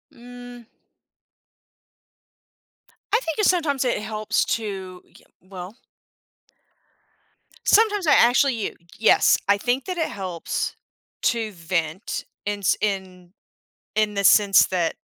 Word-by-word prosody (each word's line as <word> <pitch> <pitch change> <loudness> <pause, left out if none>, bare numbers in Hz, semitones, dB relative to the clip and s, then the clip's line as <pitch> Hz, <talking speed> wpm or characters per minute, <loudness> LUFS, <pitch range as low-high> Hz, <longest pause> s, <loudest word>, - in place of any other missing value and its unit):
Mm. 245 0 -12 2.5
I 450 - +5
think 325 0 -4
it 420 - +3
sometimes 290 -7 +1
it 245 - 0
helps 215 0 -1
to, 190 -5 -7
y - - -29 0.3
well 185 +2 -10 1.9
Sometimes 415 -4 +3
I - - +6
actually 255 +3 +4
you 220 - -4 0.2
yes. 220 - +4
I 200 0 +4
think 245 +5 -1
that 365 -1 -4
it 325 - -1
helps 185 -4 -4 0.5
to 225 -2 0
vent 165 0 -3 0.2
in 205 0 -2
s 195 - +2
in 185 -3 -4 0.6
in 215 -1 +1
the 200 0 -2
sense 200 -1 +6
that 175 -3 -1
215 Hz, 115 wpm, -23 LUFS, 190-245 Hz, 2.5 s, I